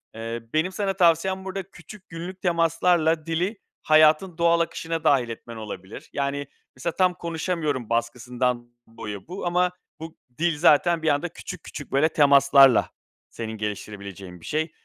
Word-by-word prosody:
eee, 115 +1 -5
benim 160 +4 +1
sana 195 0 -1
tavsiyem 190 +1 +2
burada 190 0 -4
küçük 210 -1 -14
günlük 180 +3 -8
temaslarla 165 -2 +2
dili 175 +6 -1 0.3
hayatın 155 +3 +4
doğal 170 0 +3
akışına 165 -1 -2
dâhil 135 -6 +3
etmen 115 0 -8
olabilir. 105 -2 -9
Yani, 140 0 -2 0.3
mesela 160 +6 -4
tam 185 -1 +3
konuşamıyorum 160 - -3
baskısından 120 +1 -1 0.2
boyu 110 -3 -8
bu 180 +3 -6
ama 180 +1 +2 0.3
bu 160 +1 -9 0.2
dil 170 -1 +1
zaten 170 +2 +4
bir 160 - +1
anda 145 +4 0
küçük 180 +1 -9
küçük, 145 - -9
böyle 145 +4 +3
temaslarla 140 -3 +5 0.4
senin 110 -1 -6
geliştirebileceğin 100 -4 -7
bir - - -13
şey. 155 +1 -2
155 Hz, 145 wpm, -24 LUFS, 120-175 Hz, 0.4 s, temaslarla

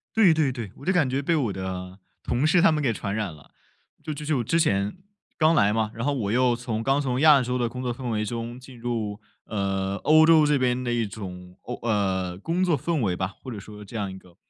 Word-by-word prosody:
对 200 -7 +6
对 155 -4 +1
对， 115 -6 -6
我 140 - -12
就 190 - +2
感 160 -8 +2
觉 135 +2 0
被 165 +4 +1
我 120 -9 0
的 95 0 -6 0.2
同 130 +5 0
事 170 +2 +4
他 165 - +6
们 150 -1 0
给 125 - +2
传 100 -1 -3
染 105 -6 -2
了。 75 - -17 0.5
就 155 -1 -4
就 150 +1 -7
就 150 -2 +1
我 - - 0
之 165 +8 +1
前， 100 - +1 0.4
刚 160 +1 +4
来 100 -5 +4
嘛， 110 0 0
然 115 +2 -4
后 145 - +1
我 105 -6 -2
又 125 0 +3
从 115 -2 -3
刚 135 +4 +2
从 130 -3 -1
亚 150 -4 +7
洲 125 +1 -1
的 120 -2 0
工 125 +2 -6
作 125 -1 -1
氛 125 0 -5
围 110 -1 -1
中 120 +2 -5
进 125 -2 -13
入， 115 -4 -3 0.3
呃， 95 -2 -2
欧 155 +5 +5
洲 160 -2 +6
这 150 -1 +3
边 125 0 0
的 120 - -1
一 115 -1 +1
种， 90 -3 -8
欧 125 - -5
呃， 95 -4 0
工 170 - -1
作 170 -5 +2
氛 160 +1 -1
围 95 -5 0
吧， 95 +2 -3
或 130 - -7
者 105 - -6
说 105 +1 -11
这 115 - -12
样 100 -3 -2
一 95 - -8
个 90 -2 -18
120 Hz, 275 characters per minute, -25 LUFS, 100-140 Hz, 0.5 s, 亚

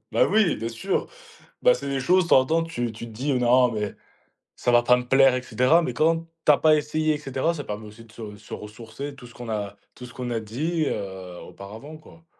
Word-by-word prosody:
Bah, - - +4
oui, 215 -6 +3
bien 115 - -4
sûr. 150 +12 -2 0.5
Bah, - - +5
c'est - - -6
des 135 -1 -1
choses, 180 +7 +3
de 165 - -8
temps - - +7
en 130 - -2
temps, 165 +2 +2
tu 120 -9 -3
tu 115 +2 -8
te 115 - -11
dis: 130 +7 -2
«Non, 125 0 +4
mais 105 -2 -3 0.6
ça 120 - 0
va 120 - +6
pas 125 +1 +5
me 125 0 -4
plaire», 135 0 +5
et 125 - -2
cetera. 130 +6 +3
Mais 125 - -3
quand 165 +5 +1 0.2
tu - - +7
as 145 - +4
pas 155 -1 +5
essayé, 155 +1 0
et - - -4
cetera, 140 +3 -1
ça 145 - -5
permet 105 +1 -6
aussi 110 +2 -13
de 115 - -20
se 110 -3 -9
se 105 - -12
ressourcer 110 +6 -8
tout 125 -3 -12
ce 120 - -16
qu'on 120 -1 -9
a 105 -2 -3 0.2
tout 125 - -10
ce 125 - -13
qu'on 125 -1 -5
a 115 -1 -1
dit, 150 +9 -2
heu, 95 -3 -5
auparavant, 110 +11 -10
quoi. 160 +1 -18
125 Hz, 250 wpm, -24 LUFS, 115-155 Hz, 0.6 s, temps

